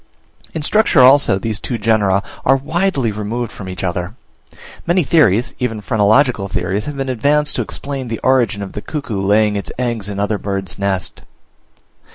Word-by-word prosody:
In 160 Hz, -, -3 dB
structure 210 Hz, -5 st, +3 dB
also 130 Hz, -5 st, +6 dB
these 110 Hz, +1 st, -2 dB
two 120 Hz, -, -3 dB
genera 105 Hz, -3 st, +2 dB, 0.2 s
are 135 Hz, -, +4 dB
widely 145 Hz, -, 0 dB
removed 110 Hz, +3 st, -4 dB
from 95 Hz, -2 st, -8 dB
each 90 Hz, 0 st, -6 dB
other. 90 Hz, +2 st, -3 dB, 0.7 s
Many 175 Hz, +1 st, +3 dB
theories, 125 Hz, -, +3 dB
even 115 Hz, -3 st, -2 dB
phrenological 110 Hz, +1 st, +2 dB
theories, 95 Hz, +2 st, -2 dB
have 150 Hz, -1 st, -6 dB
been 135 Hz, 0 st, -2 dB
advanced 145 Hz, +4 st, +1 dB
to -, -, +1 dB
explain 135 Hz, -2 st, -5 dB
the 115 Hz, -1 st, -3 dB
origin 120 Hz, -6 st, +2 dB
of 95 Hz, -, -7 dB
the 105 Hz, -, -6 dB
cuckoo 125 Hz, -10 st, -4 dB
laying 105 Hz, +1 st, +2 dB
its 100 Hz, -, -4 dB
eggs 115 Hz, -5 st, -2 dB
in 100 Hz, -1 st, -5 dB
other 105 Hz, 0 st, -1 dB
birds' 95 Hz, -5 st, -4 dB
nests. 95 Hz, -3 st, -2 dB
M. -, -, -23 dB
110 Hz, 175 wpm, -17 LUFS, 100-135 Hz, 0.7 s, also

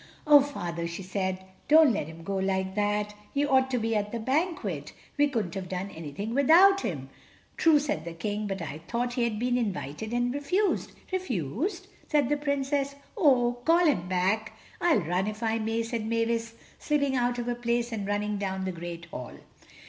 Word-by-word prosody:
"Oh, 295 Hz, -1 st, +8 dB
Father," 175 Hz, -12 st, -4 dB
she 170 Hz, +3 st, -6 dB
said, 190 Hz, 0 st, -3 dB, 0.2 s
"don't 310 Hz, -4 st, +7 dB
let 175 Hz, -7 st, -2 dB
him 160 Hz, +1 st, -10 dB
go 195 Hz, +3 st, -2 dB
like 190 Hz, 0 st, 0 dB
that. 210 Hz, 0 st, 0 dB, 0.2 s
He 285 Hz, +1 st, +2 dB
ought 265 Hz, -2 st, +3 dB
to 255 Hz, -, 0 dB
be 225 Hz, -1 st, 0 dB
at 210 Hz, 0 st, -1 dB
the 235 Hz, -, -2 dB
banquet. 310 Hz, +9 st, -1 dB, 0.2 s
We 290 Hz, 0 st, +4 dB
couldn't 220 Hz, -11 st, -2 dB
have 185 Hz, -2 st, -5 dB
done 190 Hz, +2 st, -4 dB
anything 170 Hz, +8 st, -5 dB
without 350 Hz, +9 st, +6 dB
him." 135 Hz, -, -4 dB, 0.5 s
"True," 320 Hz, -2 st, +5 dB
said 285 Hz, -, -1 dB
the 170 Hz, 0 st, -6 dB
King, 205 Hz, +5 st, -3 dB
"but 195 Hz, -3 st, -3 dB
I 155 Hz, -1 st, -6 dB
thought 240 Hz, +1 st, -1 dB
he 245 Hz, -, 0 dB
had 230 Hz, -3 st, 0 dB
been 245 Hz, +2 st, +1 dB
invited, 205 Hz, -, -3 dB
and 245 Hz, +1 st, 0 dB
refused." 360 Hz, +9 st, 0 dB, 0.2 s
"Refused?" 350 Hz, -, -2 dB, 0.2 s
said 290 Hz, -5 st, +2 dB
the 295 Hz, -, +2 dB
Princess, 280 Hz, -1 st, -1 dB, 0.2 s
"oh, 250 Hz, -, +3 dB
call 340 Hz, +4 st, +4 dB
him 180 Hz, -, +2 dB
back!" 195 Hz, +4 st, 0 dB, 0.3 s
"I'll 330 Hz, -, +4 dB
run 180 Hz, +4 st, 0 dB
if 215 Hz, +2 st, -5 dB
I 225 Hz, 0 st, +1 dB
may," 225 Hz, +1 st, -1 dB
said 225 Hz, -1 st, -3 dB
Mavis, 230 Hz, 0 st, -1 dB, 0.2 s
slipping 280 Hz, -3 st, +1 dB
out 245 Hz, -1 st, +1 dB
of 240 Hz, -, -3 dB
her 245 Hz, -, 0 dB
place 240 Hz, 0 st, -1 dB
and 205 Hz, -3 st, -3 dB
running 205 Hz, 0 st, -1 dB
down 190 Hz, -1 st, -2 dB
the 190 Hz, -, -1 dB
great 170 Hz, -1 st, -7 dB
hall. 125 Hz, -7 st, -8 dB
225 Hz, 190 wpm, -28 LUFS, 190-275 Hz, 0.5 s, Oh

